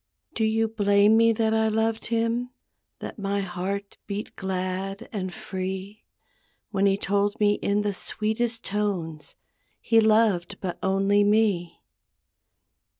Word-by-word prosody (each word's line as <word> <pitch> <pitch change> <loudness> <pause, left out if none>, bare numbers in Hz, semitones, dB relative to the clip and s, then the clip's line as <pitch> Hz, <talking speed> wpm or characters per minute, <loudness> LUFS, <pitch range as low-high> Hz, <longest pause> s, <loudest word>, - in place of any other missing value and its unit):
Do 220 - -1
you 225 +1 +2
blame 205 -1 +4
me 230 0 +5
that 220 0 +1
I 220 0 +2
loved 220 +1 0
him, 230 +1 0 0.5
That - - -7
my 200 0 -1
heart 195 +2 -4
beat 205 +1 -5
glad 190 +1 -3
and 185 -3 -3
free, 190 +3 -5 0.7
When 200 -1 +2
he 195 0 +2
told 200 +1 0
me 205 -1 +3
in 205 +1 +1
the 205 -1 -1
sweetest 220 +4 -1
tones 185 -7 -3 0.4
He 225 -1 +4
loved 215 -4 +2
but 180 -3 -4
only 195 +2 +2
me? 205 -5 +1
205 Hz, 130 wpm, -25 LUFS, 195-220 Hz, 0.7 s, me